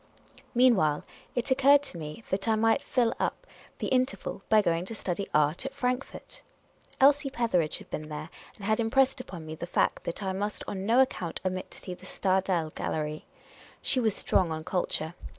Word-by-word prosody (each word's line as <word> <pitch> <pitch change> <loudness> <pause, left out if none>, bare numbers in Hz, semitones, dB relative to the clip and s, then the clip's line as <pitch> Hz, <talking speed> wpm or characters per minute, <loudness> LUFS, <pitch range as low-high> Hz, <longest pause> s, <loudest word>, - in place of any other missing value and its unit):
Meanwhile, 205 -13 +4 0.3
it 245 +2 -1
occurred 280 +2 +6
to 230 - -6
me 155 +8 -7
that 195 +3 0
I 220 - +4
might 225 +4 +3
fill 240 -3 +1
up - - -2 0.3
the - - -3
in 255 0 +3
terval 270 - -6
by 220 - +6
going 170 -4 +1
to 225 - -6
study 195 -1 -3
art 150 - +2
at 270 - -5
Frankfort. 255 - -3 0.6
Elsie 280 +1 +5
Petheridge 205 - +1
had - - -14
been 155 0 -4
there, 155 +1 -6 0.2
and 200 - -9
had 215 +2 +2
impressed 255 +4 +3
upon 175 -9 -9
me 155 - -6
the 170 +2 -6
fact - - +1
that 170 +4 -3
I 190 -1 -1
must 205 +2 -3
on 195 0 -4
no 240 +3 +6
account 185 -10 -1
omit 185 0 -2
to - - -10
see 185 - -7
the 180 +1 -11
Stadel 185 -5 +1
Gallery. 155 0 -3 0.6
She 260 - +3
was 220 -4 +2
strong 180 -3 +2
on 160 0 -3
culture. 160 -2 -1
200 Hz, 190 wpm, -29 LUFS, 170-250 Hz, 0.6 s, occurred